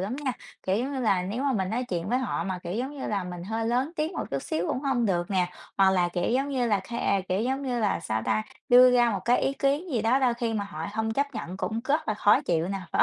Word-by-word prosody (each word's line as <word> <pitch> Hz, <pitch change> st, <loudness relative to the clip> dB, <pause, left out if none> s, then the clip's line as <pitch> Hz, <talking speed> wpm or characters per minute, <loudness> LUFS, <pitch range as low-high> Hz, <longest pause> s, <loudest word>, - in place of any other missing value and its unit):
lắm 205 Hz, +7 st, -3 dB
nha, 275 Hz, -3 st, -2 dB, 0.3 s
kiểu, 190 Hz, +1 st, +1 dB
giống 260 Hz, +4 st, -2 dB
như 265 Hz, -, -2 dB
là, 195 Hz, -6 st, +2 dB
nếu 210 Hz, +8 st, -3 dB
mà 280 Hz, -1 st, +1 dB
mình 190 Hz, -4 st, -1 dB
nói 250 Hz, +3 st, -1 dB
chuyện 175 Hz, +1 st, -2 dB
với 250 Hz, -, +2 dB
họ 260 Hz, -, -2 dB
mà, 190 Hz, -2 st, -3 dB
kiểu, 175 Hz, 0 st, -6 dB
giống 265 Hz, +6 st, -3 dB
như -, -, -4 dB
là, 200 Hz, -3 st, -1 dB
mình 175 Hz, -1 st, -6 dB
hơi 225 Hz, +3 st, -2 dB
lớn 250 Hz, +5 st, +1 dB
tiếng 310 Hz, +4 st, -1 dB
một -, -, -3 dB
chút 140 Hz, -1 st, -2 dB
xíu 165 Hz, +3 st, -2 dB
cũng 255 Hz, -, -1 dB
hông 265 Hz, -4 st, +1 dB
được 175 Hz, -2 st, 0 dB
nè, 180 Hz, -2 st, +1 dB, 0.2 s
hoặc 195 Hz, -1 st, +5 dB
là, 180 Hz, -2 st, +2 dB
kiểu, 175 Hz, 0 st, -1 dB
giống 270 Hz, +4 st, +1 dB
như 255 Hz, -3 st, 0 dB
là 205 Hz, -4 st, +2 dB
ke 200 Hz, -5 st, 0 dB
kiểu, 185 Hz, +2 st, +1 dB
giống 265 Hz, +4 st, -1 dB
như 245 Hz, -3 st, -1 dB
là 210 Hz, -5 st, +1 dB
sao 110 Hz, -8 st, -2 dB
ta? 215 Hz, -, +1 dB, 0.3 s
Đưa 250 Hz, +1 st, +8 dB
ra 240 Hz, -1 st, +4 dB
một 195 Hz, -3 st, -2 dB
cái 245 Hz, +1 st, +3 dB
ý 270 Hz, -, +1 dB
kiến 285 Hz, +6 st, 0 dB
gì 230 Hz, -4 st, +1 dB
đó 235 Hz, +4 st, +3 dB
đôi 250 Hz, -3 st, +2 dB
khi 235 Hz, -2 st, -2 dB
mà 205 Hz, -2 st, -1 dB
họ 165 Hz, -5 st, -6 dB
hông 220 Hz, 0 st, -1 dB
chấp 280 Hz, +1 st, -1 dB
nhận 185 Hz, -4 st, -5 dB
cũng 220 Hz, +3 st, -2 dB
rất 295 Hz, 0 st, 0 dB
là 215 Hz, -, +1 dB
khó 210 Hz, 0 st, +4 dB
chịu 165 Hz, 0 st, 0 dB
nè, 195 Hz, 0 st, -2 dB
phải -, -, +4 dB
225 Hz, 295 wpm, -27 LUFS, 190-255 Hz, 0.3 s, Đưa